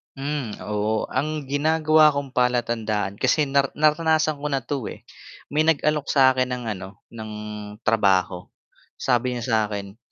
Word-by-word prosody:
Hmm, 140 -5 -4
oo 105 +1 -1
ang 150 +3 -2
ginagawa 155 +2 +3
kong 140 -2 -3
palatandaan 115 -5 0
kasi 135 +4 +3
nar 140 0 +2
naranasan 155 0 +2
ko 150 - -3
na 135 -3 -1
'to, 135 -1 -3
eh, - - -9 0.5
may 155 +2 +1
nag-alok 150 -2 +1
sa 135 -2 +5
akin 130 -1 -1
ng 125 - -7
ano, 95 0 -9
ng 110 -2 -8 0.5
trabaho, 95 -5 +1 0.5
sabi 125 0 0
niya 120 - -4
sa 115 -2 +1
akin 100 0 -7
130 Hz, 150 wpm, -23 LUFS, 110-150 Hz, 0.5 s, sa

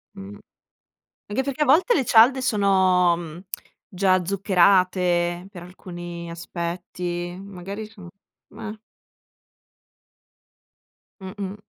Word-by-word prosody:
Mh. 100 +1 -10 0.9
Anche 215 +6 -1
perché 280 +2 -1
a - - 0
volte 325 - +4
le 270 - +1
cialde 245 +4 +5
sono 190 -6 +3
mh 170 +1 -9 0.4
già 185 -1 +1
zuccherate 180 -2 +2
per 175 -4 -10
alcuni 175 -1 -9
aspetti, 175 +1 -5
magari 200 +2 -7
sono, 195 -5 -13 0.4
mah! 215 0 -7 2.4
Mh-mh, 190 +1 -6
185 Hz, 90 wpm, -23 LUFS, 175-205 Hz, 2.4 s, cialde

